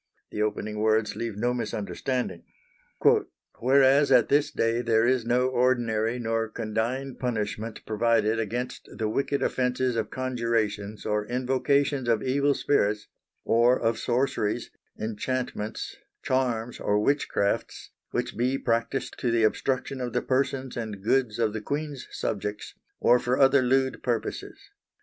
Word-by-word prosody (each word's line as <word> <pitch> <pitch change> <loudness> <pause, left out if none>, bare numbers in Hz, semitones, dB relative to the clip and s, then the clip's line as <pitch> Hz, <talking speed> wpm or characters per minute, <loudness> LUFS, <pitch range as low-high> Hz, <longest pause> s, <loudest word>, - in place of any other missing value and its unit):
The 105 - -3
opening 105 0 -2
words 110 0 +2
leave 115 -3 -4
no 120 +3 +1
misunderstanding: 110 -2 -3 1.2
"Whereas 135 +3 +4
at - - +5
this 145 +1 +3
day 115 +1 0
there 115 -1 +3
is 125 -2 +1
no 125 +1 +3
ordinary 120 -3 +1
nor 115 -2 -1
condigne 115 +5 -2
punishment 110 -2 -3
provided 115 0 +2
against 120 +3 -4
the 110 - -1
wicked 140 +5 0
offences 125 -1 0
of 115 - -1
conjurations 115 -5 -2
or 105 0 -1
invocations 130 +1 +1
of 115 -2 +2
evil 140 +2 +2
spirits, 105 -7 +1 0.4
or 120 +2 +4
of 115 0 0
sorceries, 120 -4 -1 0.3
inchantments, 110 0 -3 0.3
charmes 125 -3 -1
or 105 - +1
witchcraftes, 105 -5 0 0.2
which - - -2
be 125 +3 +1
practised 115 +2 -1
to 125 - 0
the 115 -1 +2
obstruction 130 +4 0
of 120 -2 -3
the - - 0
persons 130 0 -1
and 110 -4 -5
goods 120 -1 +1
of 110 -3 +1
the 110 - -4
Queene's 145 +2 -4
subjects, 105 0 -4 0.3
or 125 +1 +5
for 125 +2 0
other 135 0 +5
lewd 130 +1 +1
purposes. 120 -2 -3
120 Hz, 135 wpm, -27 LUFS, 110-130 Hz, 1.2 s, at